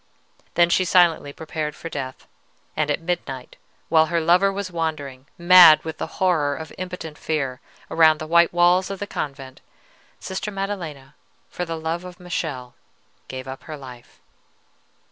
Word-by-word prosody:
"Then 175 0 +4
she 185 - +3
silently 170 -5 +3
prepared 155 0 -5
for - - -8
death; 135 -5 -6 0.5
and 150 -1 0
at 145 - 0
midnight, 165 -7 -4 0.3
while 160 -1 +4
her 170 0 0
lover 180 +4 +4
was 195 -1 -5
wandering, 145 -6 -4
mad 175 -2 +8
with 160 -1 -6
the - - -3
horror 160 -7 +1
of 160 0 -8
impotent 180 -4 -7
fear, 135 -5 -2 0.3
around 160 -1 +5
the 155 - -6
white 170 +2 +4
walls 175 +2 +3
of 195 - -4
the 205 - -4
convent, 135 -7 -6 0.6
Sister 190 +3 -4
Maddelena, 175 -9 -5 0.4
for 180 - -4
love 165 +1 -3
of 180 -1 -11
Michele, 155 -8 -4 0.5
gave 130 0 -7
up 130 0 -8
her 155 -2 -7
life. 125 -3 -13
160 Hz, 150 wpm, -23 LUFS, 145-180 Hz, 0.6 s, mad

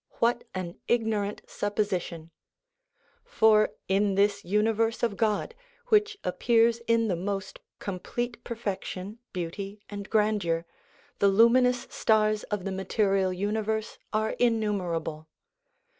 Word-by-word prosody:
What 235 +1 +1
an 175 -2 -5
ignorant 220 -3 0
supposition! 185 -6 -2 0.9
For, 215 -1 +4 0.2
in 195 +1 +2
this 200 0 +2
universe 220 +4 +1
of 230 -4 +1
God, 215 - 0 0.4
which 425 -1 +3
appears 230 +4 +3
in 230 -1 +3
the 185 - +1
most 195 +2 -4 0.2
complete 235 +5 -4
perfection, 205 -2 -5
beauty, 195 +3 -5
and 200 -1 -6
grandeur, 205 -6 +1 0.5
the 200 - +5
luminous 240 +4 +4
stars 215 -1 +2
of 205 -3 -3
the 195 - -2
material 190 0 +1
universe 215 +3 -2
are 215 0 0
innumerable 180 -9 0
210 Hz, 110 wpm, -28 LUFS, 190-225 Hz, 0.9 s, the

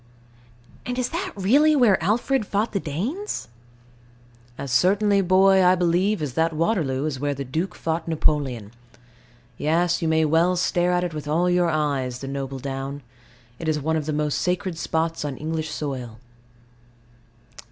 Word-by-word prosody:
And 250 0 -4
is 250 -1 -1
that 365 +3 -3
really 280 +11 +4
where 215 - +4
Alfred 225 +4 +1
fought 210 +3 0
the 200 - -1
Danes? 210 - -4 1.1
As 140 - -5
certainly, 200 - +3
boy, 190 +1 +5
I 180 +1 +5
believe, 180 +2 +1
as 140 -4 -3
that 165 +3 +1
Waterloo 155 -5 0
is 145 -4 -3
where 145 0 -1
the 140 - -4
Duke 165 +8 -3
fought 160 0 -3
Napoleon. 140 -9 0 0.9
Yes: 170 +3 +1
you 165 - 0
may 160 0 +3
well 165 +4 +3
stare 175 0 +1
at 180 0 +1
it 175 -2 -3
with 150 -1 -6
all 170 +4 +2
your 175 -1 +2
eyes, 140 -5 -1
the 135 - -7
noble 135 0 -4
down. 135 +1 -5 0.6
It 165 - -5
is 155 -1 +1
one 160 +3 -1
of 155 -1 -2
the - - 0
most 150 -1 0
sacred 180 0 -1
spots 160 0 -2
on 140 -3 -4
English 160 0 -3
soil. 130 -7 -5
165 Hz, 165 wpm, -23 LUFS, 145-185 Hz, 1.1 s, boy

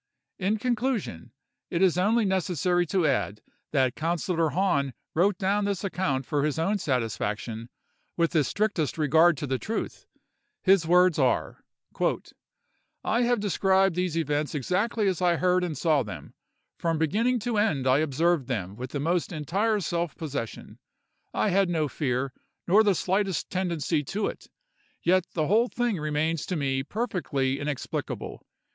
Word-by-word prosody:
"In 200 +3 +1
conclusion, 235 - -2 0.4
it 175 +2 +1
is 185 -4 +4
only 210 +5 +2
necessary 180 -2 +1
to 185 0 +1
add 105 - 0 0.3
that 130 -4 +2
Councillor 165 0 0
Hahn 140 -7 0 0.2
wrote 185 +3 +2
down 200 +2 +1
this 200 -1 -2
account 145 -9 -1
for 145 +1 0
his 150 0 0
own 195 +6 +1
satisfaction, 115 - -2 0.5
with 170 -1 +2
the 155 -3 +3
strictest 185 - -1
regard 160 +2 +4
to 135 -2 -2
truth. 225 - -4 0.6
His 190 -4 +4
words 180 -1 +4
are:— 130 -3 0 1.4
"'I 230 - +1
have 240 -1 +2
described 195 -2 +2
these 180 -2 -1
events 150 -1 -1
exactly 200 - 0
as 185 -3 0
I 175 -1 +3
heard 180 +1 +2
and 165 -5 -3
saw 155 -1 +2
them: 95 - -8 0.5
from 165 -1 0
beginning 220 +11 +1
to 225 -1 0
end 180 -12 +1
I 130 +2 +4
observed 155 -1 +1
them 100 -6 -3
with 125 +3 -6
the 145 - -1
most 170 +4 0
entire 195 +8 0
self 170 -3 -2
possession. 140 -8 -6 0.5
I - - +1
had 195 -1 +2
no 160 -3 +1
fear, 130 -1 -2 0.3
nor 200 +5 +6
the 200 -3 +3
slightest 190 0 -1
tendency 170 -4 -1
to 200 +8 -2
it; - - -5 0.6
yet 185 0 +3
the 155 -3 +1
whole 220 +8 +3
thing 240 -7 -1
remains 155 +1 -1
to 180 - -2
me 135 -3 0
perfectly 140 - -2
inexplicable. 145 -2 -4
170 Hz, 150 wpm, -27 LUFS, 145-195 Hz, 1.4 s, nor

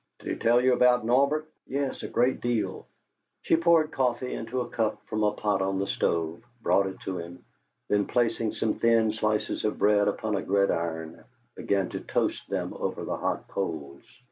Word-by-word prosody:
"Did - - -8
he - - -1
tell 120 +1 +4
you 130 +1 +4
about 125 -1 +4
Norbert?" 140 +6 +2 0.2
"Yes 140 0 -2
a - - -4
great 125 +2 +1
deal." 120 -2 -2 0.6
She - - +3
poured 165 -2 +4
coffee 125 -2 0
into 120 +3 -3
a 120 - -4
cup 110 -2 -1
from 110 - -3
a 105 - +3
pot 105 -2 0
on 95 0 0
the 100 - 0
stove, 85 -3 -1 0.2
brought 100 -3 +2
it 95 - -7
to 95 -2 -4
him, 85 +1 -9 0.4
then 105 -1 +1
placing 115 -2 0
some 110 - -1
thin 115 -2 +3
slices 110 -1 -1
of 105 - -1
bread 105 0 +3
upon 105 +1 -1
a 100 - -1
gridiron, 85 -4 -1 0.3
began 100 -2 0
to - - -4
toast - - -2
them - - -2
over - - -3
the - - -2
hot - - -2
coals. 75 -8 -4
110 Hz, 185 wpm, -27 LUFS, 95-125 Hz, 0.6 s, tell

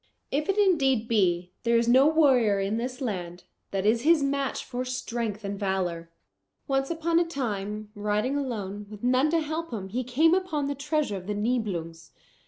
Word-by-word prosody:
If 300 +6 -1
it 390 - +1
indeed 270 - +3
be, 180 -6 +1
there 235 0 +3
is 230 0 +1
no 260 +4 +6
warrior 260 -10 +4
in 195 +3 -1
this 250 +3 -4
land, 180 -7 -4 0.3
that 195 0 -2
is 225 +2 +3
his 315 0 +4
match 275 -1 -1
for 250 0 -3
strength 235 -4 -3
and 200 0 -4
valour. 180 -4 -2 0.6
"Once 270 0 0
upon 335 0 +1
a - - +4
time 210 -9 -4
riding 210 +5 -1
alone, 210 -7 -4
with 210 0 -11
none 255 +4 +3
to 330 +1 +2
help 320 +2 -3
him, 195 -5 -5
he 250 +6 -2
came 290 +7 +3
upon 365 -6 0
the 285 - -1
treasure 290 -5 -1
of 185 0 -9
the 210 - -2
Nibelungs. 195 -8 -2
240 Hz, 185 wpm, -27 LUFS, 205-280 Hz, 0.6 s, no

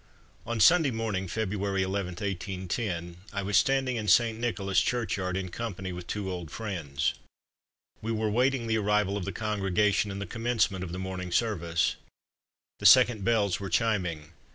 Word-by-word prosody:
On 120 -1 -2
Sunday 160 - +6
morning, 110 -5 -2
February 100 -1 -1
11, 95 -1 -2
1810, 90 -1 -4 0.2
I 100 -1 -2
was 100 +1 -1
standing 135 -2 +3
in 110 -2 -3
St. 115 +1 +4
Nicholas 100 -5 +1
churchyard, 100 -7 -1
in 95 -1 -3
company 95 -3 -5
with 90 0 -8
two 100 -2 -3
old 90 -3 -5
friends. 80 -10 -2 0.9
We 115 - -3
were 110 -1 0
waiting 125 +2 +2
the 110 -1 +1
arrival 105 -1 +1
of 100 -3 -3
the 100 - -3
congregation, 105 0 +1
and 100 0 -5
the 100 - -3
commencement 115 -5 0
of 85 - -6
the 90 - -5
morning 95 -1 -5
service. 85 -6 0 0.8
The 105 - +5
second 120 -2 +6
bells 100 -5 +2
were 100 -1 -5
chiming. 90 -10 0
100 Hz, 160 wpm, -28 LUFS, 95-110 Hz, 0.9 s, Sunday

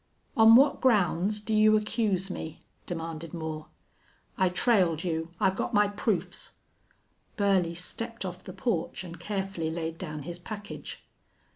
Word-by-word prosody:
"On 225 0 +8
what 275 +3 +5
grounds 210 -3 +3
do 215 +1 -3
you 215 0 +6
accuse 210 -3 0
me?" 160 -2 -7 0.2
demanded 165 -1 -5
Moore. 155 -1 -5 0.7
"I 185 -1 +3
trailed 180 -4 +2
you. 165 -2 -2
I've 190 0 +3
got 230 - -2
my 205 0 +5
proofs." 195 -4 -2 0.8
Burley 190 -5 +2
stepped 230 +5 -5
off 180 -1 -6
the - - -8
porch 190 -2 -2
and 170 -2 -9
carefully 195 -3 -3
laid 165 0 -4
down 150 -5 -5
his 175 +3 -6
package. 205 +2 -8
185 Hz, 140 wpm, -28 LUFS, 165-210 Hz, 0.8 s, On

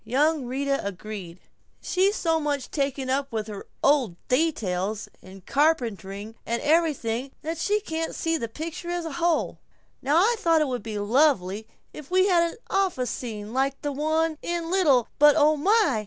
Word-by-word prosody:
Young 285 +4 +1
Rita 275 +2 -1
agreed, 195 -2 -7 0.4
"She's 385 +3 +1
so 325 -4 +1
much 290 -4 -2
taken 275 -2 -1
up 275 +1 -1
with 220 -2 -2
her 210 -2 -8 0.2
old 270 -10 +3
details 220 - 0
and 190 0 -14
carpentering 225 -9 0
and 235 +1 -2
everything 275 -6 +1
that 325 +1 -3
she 415 +4 +1
can't 325 -5 -4
see 325 0 0
the 235 -8 -2
picture 320 +7 -6
as 350 -1 -2
a 325 - -4
whole. 340 -1 +1 0.4
Now 290 +4 +2
I 450 +7 +4
thought 330 -6 +3
it 305 - +2
would 250 -2 -3
be 220 -2 -5
lovely 220 -3 +2 0.3
if 295 -2 -10
we 370 +1 +4
had 340 -3 +3
an - - -11
office 365 - 0
scene 215 -3 -6
like 270 +1 0
the 290 - -1
one 315 +2 0
in 340 -1 -3
'Little, 285 - +3
But 295 0 +7
Oh 305 0 +4
My!' 380 - +3
285 Hz, 170 wpm, -25 LUFS, 230-325 Hz, 0.4 s, But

